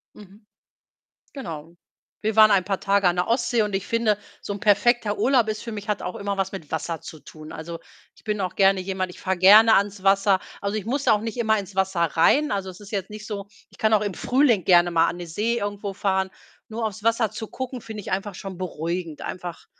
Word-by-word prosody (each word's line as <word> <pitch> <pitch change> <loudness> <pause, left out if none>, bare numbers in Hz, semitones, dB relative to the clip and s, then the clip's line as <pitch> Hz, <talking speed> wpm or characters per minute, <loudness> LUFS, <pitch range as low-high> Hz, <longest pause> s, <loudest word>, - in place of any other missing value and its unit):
Mhm. 205 +1 -16 0.9
Genau. 165 - -8 0.5
Wir 220 0 0
waren 215 0 +7
ein 190 -3 +4
paar 195 0 -2
Tage 200 -1 +2
an 175 0 +3
der 180 +3 0
Ostsee 235 -1 +2
und 210 -1 -3
ich 195 - -5
finde, 230 -3 +1 0.2
so - - -5
'n 200 - -5
perfekter 215 0 +2
Urlaub 250 -4 +3
ist 215 0 -3
für 235 - -6
mich 210 -2 -7
hat 210 - -1
auch 180 - -5
immer 200 0 -3
was 195 0 -1
mit 165 -7 -9
Wasser 160 0 -3
zu 155 - -10
tun. 155 +2 -12
Also, 165 +1 -7 0.4
ich - - -22
bin 210 -2 -2
auch 185 -1 -3
gerne 195 -1 +4
jemand 185 0 -3
ich - - -13
fahre 190 -1 -1
gerne 215 +4 +8
ans 200 0 0
Wasser. 195 0 +3 0.2
Also, 200 +2 -2
ich 210 - -3
muss 275 +3 -1
da - - +5
auch 210 - +2
nicht 225 +2 -5
immer 220 -2 +2
ins 195 -1 -8
Wasser 190 -2 0
rein. 170 - +3
Also, 195 -2 -2
es 185 - -13
ist 205 -1 -12
jetzt 195 -2 -3
nicht 215 0 -9
so 200 -2 -5 0.2
ich - - -20
kann 220 0 +2
auch 215 - +5
im 205 -2 -3
Frühling 245 - +2
gerne 175 -1 +5
mal 165 0 +3
an 175 - -4
die 175 - -6
See 220 +8 -1
irgendwo 205 0 -4
fahren. 190 -1 0 0.4
Nur 225 +1 -4
aufs 215 +1 -7
Wasser 230 -1 +2
zu 220 +1 -6
gucken 260 -1 -6
finde 220 -2 -8
ich - - -8
einfach 195 +1 -2
schon 190 -1 -8
beruhigend. 170 -2 -4
Einfach 175 -2 -7
200 Hz, 235 wpm, -24 LUFS, 185-220 Hz, 0.9 s, gerne